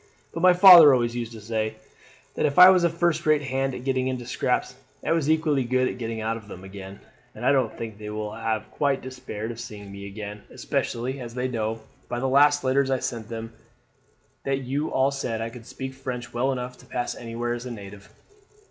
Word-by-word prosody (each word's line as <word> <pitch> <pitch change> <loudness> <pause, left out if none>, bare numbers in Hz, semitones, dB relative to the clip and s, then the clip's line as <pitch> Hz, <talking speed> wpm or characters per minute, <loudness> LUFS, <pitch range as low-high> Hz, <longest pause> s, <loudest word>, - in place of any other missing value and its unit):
But 165 - -4
my 180 0 +7
father 175 -6 +10
always 120 -1 -1
used 120 -1 -4
to 110 - -9
say, 110 0 -2 0.6
that - - +1
if 140 - -4
I 180 +1 +11
was 185 -2 +3
a 170 - +4
first 170 0 0
rate 155 -1 +3
hand 135 -1 -1
at 125 - -7
getting 130 -1 0
into 130 -2 -3
scrapes, - - -1 0.3
I - - 0
was 165 -3 +1
equally 155 -4 +2
good 130 +1 +1
at - - -5
getting 115 -1 -4
out 110 +1 -1
of 105 -2 -13
them 90 -2 -10
again; 95 0 -10 0.3
and - - -6
I - - +5
don't - - +1
think 110 -2 -7
they 105 0 -7
will 105 0 -4
have 110 -1 -3
quite 140 -2 0
despaired 125 -4 -6
of 115 - -9
seeing 105 -3 -9
me 100 0 -8
again, 105 0 -7
especially 130 +4 -3
as 120 -2 -8
they 125 0 -1
know, 115 -2 -3 0.3
by 120 - -2
the 135 - -1
last 145 +2 +4
letters 135 +1 +2
I 130 - +2
sent 115 -3 -5
them, 115 0 -6 0.9
that 135 0 -1
you 140 +5 -2
all 135 +1 +2
said 125 -5 -3
I 115 0 -4
could 115 -2 -12
speak 130 0 -6
French 125 -2 -6
well 130 +3 +1
enough 125 -1 -5
to - - -17
pass 120 -1 -3
anywhere 120 +1 -4
as 120 +1 -6
a - - -6
native." 100 -2 -10
125 Hz, 220 wpm, -25 LUFS, 110-135 Hz, 0.9 s, I